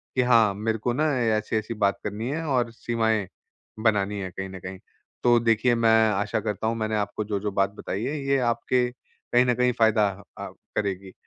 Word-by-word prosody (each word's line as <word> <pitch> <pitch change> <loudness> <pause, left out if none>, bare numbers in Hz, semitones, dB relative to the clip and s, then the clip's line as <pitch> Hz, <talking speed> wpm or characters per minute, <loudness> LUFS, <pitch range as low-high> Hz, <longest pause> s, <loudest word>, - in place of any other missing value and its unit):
कि 130 - +3
हाँ 110 -4 +5
मेरे 110 +3 -2
को 120 +3 -1
ना 150 +5 +1 0.3
अ, - - +2
ऐसी-ऐसी 110 +1 -2
बात 100 -3 0
करनी 105 +4 -4
है 160 +4 -2
और 125 -4 +1
सीमाएँ 110 -3 -1 0.6
बनानी 105 -2 +1
है 95 -1 -4
कहीं 95 +2 -6
न 95 0 -8
कहीं। 95 +1 -8 0.4
तो 120 -1 +5
देखिए 115 +1 +2
मैं 110 -1 +4
आशा 105 +1 -1
करता 105 +1 -3
हूँ 115 - 0
मैंने 110 -1 -1
आपको 105 +1 -2
जो-जो 105 0 -2
बात 100 0 +1
बताई 100 0 -4
है, 145 +4 -2
ये 140 0 +3
आपके 125 +1 0
कहीं 125 0 -1
न 125 - +3
कहीं 125 0 +2
फ़ायदा 110 -2 +4 0.3
अ, - - -5 0.3
करेगी। 100 -2 -3
110 Hz, 195 wpm, -25 LUFS, 100-120 Hz, 0.6 s, हाँ